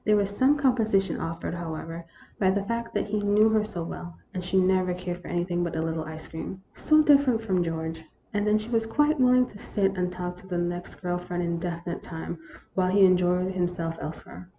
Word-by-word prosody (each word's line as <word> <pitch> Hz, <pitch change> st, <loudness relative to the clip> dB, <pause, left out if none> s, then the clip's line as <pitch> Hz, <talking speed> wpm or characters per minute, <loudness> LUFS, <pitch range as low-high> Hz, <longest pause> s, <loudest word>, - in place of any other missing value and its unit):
There 210 Hz, -, +4 dB
was 200 Hz, -1 st, +1 dB
some 270 Hz, +6 st, +4 dB
compensation 220 Hz, -8 st, +2 dB
offered, 165 Hz, 0 st, -4 dB
"however, 165 Hz, 0 st, -5 dB, 0.3 s
by 190 Hz, -, +4 dB
the 195 Hz, +1 st, +1 dB
fact 230 Hz, +2 st, -3 dB
that -, -, +1 dB
he 210 Hz, 0 st, -1 dB
knew 205 Hz, +2 st, +4 dB
her 220 Hz, -1 st, +3 dB
so 210 Hz, -6 st, -5 dB
well, 170 Hz, 0 st, -7 dB, 0.2 s
and 185 Hz, -2 st, -4 dB
she 180 Hz, +1 st, +2 dB
never 185 Hz, -1 st, +2 dB
cared 180 Hz, 0 st, -5 dB
for -, -, -11 dB
anything 175 Hz, 0 st, -1 dB
but 170 Hz, -2 st, -3 dB
a 160 Hz, -, 0 dB
little 160 Hz, -1 st, -2 dB
ice 155 Hz, 0 st, -8 dB
cream 185 Hz, +4 st, -7 dB
(so 310 Hz, 0 st, +4 dB
different 275 Hz, -6 st, +4 dB
from 185 Hz, -5 st, +1 dB
George), 160 Hz, -1 st, -4 dB, 0.3 s
and 205 Hz, 0 st, 0 dB
then 210 Hz, 0 st, +4 dB
she 215 Hz, +2 st, -6 dB
was 225 Hz, -1 st, +1 dB
quite 295 Hz, +5 st, +2 dB
willing 250 Hz, 0 st, +5 dB
to 205 Hz, -4 st, -13 dB
sit 195 Hz, -1 st, 0 dB
and 180 Hz, -1 st, -1 dB
talk 180 Hz, 0 st, -5 dB
to 185 Hz, +1 st, -15 dB
the 180 Hz, -2 st, -2 dB
next 175 Hz, 0 st, -3 dB
girl 175 Hz, 0 st, -1 dB
for 180 Hz, 0 st, -7 dB
an 175 Hz, -, 0 dB
indefinite 170 Hz, 0 st, -3 dB
time, 165 Hz, 0 st, -6 dB, 0.3 s
while 185 Hz, -1 st, +2 dB
he 195 Hz, +1 st, +6 dB
enjoyed 180 Hz, 0 st, +3 dB
himself 175 Hz, -2 st, -1 dB
elsewhere. 165 Hz, +3 st, -8 dB
185 Hz, 220 wpm, -27 LUFS, 175-210 Hz, 0.3 s, he